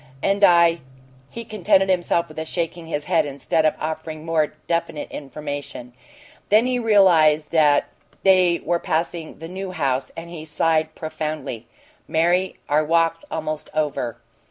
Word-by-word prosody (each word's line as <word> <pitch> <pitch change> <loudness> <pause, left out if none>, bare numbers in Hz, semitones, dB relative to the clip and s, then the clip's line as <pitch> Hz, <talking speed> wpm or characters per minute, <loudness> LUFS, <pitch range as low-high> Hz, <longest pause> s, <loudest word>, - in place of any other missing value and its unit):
And 200 +1 +1
I 170 -2 +6 0.3
" 130 +1 -28
He 230 0 -8
contented 195 -2 +2
himself 175 -2 +1
with 155 0 -6
shaking 170 -1 -4
his 150 -2 -3
head 170 -3 +2
instead 145 +2 -1
of 155 - 0
offering 155 0 -5
more 155 -2 0
definite 170 -3 -2
information. 145 -3 -7 0.6
Then 215 +3 +5
he 250 -1 0
realized 170 -9 +4
that 150 -3 +4 0.4
they 185 -3 +4
were 170 0 +1
passing 165 0 -3
the 165 - -8
New 190 +2 -6
House, 140 -7 -1
and 170 +1 -8
he 160 -3 -7
sighed 160 0 0
profoundly. 155 -7 -5 0.4
"Mary, 175 +3 +1
our 150 +1 +2
walk's 165 +1 +1
almost 155 -1 -4
over." 140 -6 -1
160 Hz, 145 wpm, -22 LUFS, 150-175 Hz, 0.6 s, I